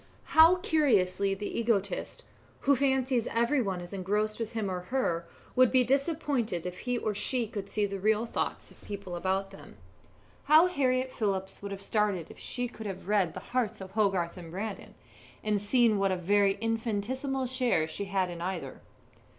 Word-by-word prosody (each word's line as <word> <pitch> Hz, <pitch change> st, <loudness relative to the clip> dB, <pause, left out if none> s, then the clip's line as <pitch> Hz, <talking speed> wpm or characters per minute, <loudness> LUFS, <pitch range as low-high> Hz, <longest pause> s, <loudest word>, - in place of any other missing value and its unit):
How 325 Hz, +3 st, +8 dB
curiously 215 Hz, -, +2 dB
the 205 Hz, +3 st, -4 dB
egotist, 200 Hz, -5 st, -1 dB, 0.4 s
who 280 Hz, -, +4 dB
fancies 265 Hz, -2 st, +1 dB
every 235 Hz, +4 st, +2 dB
one 195 Hz, -5 st, -2 dB
is 175 Hz, +2 st, -9 dB
engrossed 210 Hz, +3 st, -1 dB
with 230 Hz, 0 st, -4 dB
him 220 Hz, -3 st, -1 dB
or 185 Hz, -1 st, -2 dB
with 180 Hz, -, -13 dB
her, 170 Hz, -11 st, -1 dB, 0.3 s
would 255 Hz, -1 st, +5 dB
be 255 Hz, -1 st, +5 dB
disappointed 270 Hz, -, 0 dB
if 180 Hz, 0 st, -5 dB
he 245 Hz, 0 st, -1 dB
or 215 Hz, -2 st, -1 dB
she 240 Hz, +4 st, 0 dB
could 205 Hz, -2 st, -6 dB
see 210 Hz, 0 st, +1 dB
the 195 Hz, -1 st, -4 dB
real 215 Hz, +3 st, +2 dB
thoughts -, -, -3 dB
of -, -, -19 dB
the -, -, -19 dB
people 200 Hz, -3 st, -6 dB
about 190 Hz, +2 st, -1 dB
them.. -, -, -13 dB, 0.7 s
How 310 Hz, +3 st, +7 dB
Harriett 260 Hz, -6 st, +1 dB
Phillips 195 Hz, -5 st, -2 dB
would 200 Hz, 0 st, -6 dB
have 195 Hz, 0 st, -6 dB
started 205 Hz, -7 st, 0 dB
if -, -, -14 dB
she 245 Hz, 0 st, -3 dB
could 220 Hz, -2 st, -8 dB
have 190 Hz, -2 st, -7 dB
read 200 Hz, -4 st, +2 dB
the -, -, -4 dB
hearts 225 Hz, -4 st, 0 dB
of 190 Hz, -1 st, -8 dB
Hogarth 195 Hz, -5 st, +1 dB
and 170 Hz, -2 st, -9 dB
Brandon, 200 Hz, +4 st, -6 dB, 0.5 s
and 210 Hz, -2 st, +1 dB
seen 220 Hz, 0 st, +3 dB
what 195 Hz, -1 st, +2 dB
a -, -, +1 dB
very 200 Hz, +2 st, +3 dB
infinitesimal 225 Hz, +5 st, -2 dB
share 245 Hz, -, +1 dB
she 200 Hz, +5 st, -4 dB
had 190 Hz, -2 st, 0 dB
in 170 Hz, -1 st, -7 dB
either. 180 Hz, 0 st, -4 dB
210 Hz, 185 wpm, -29 LUFS, 190-250 Hz, 0.7 s, How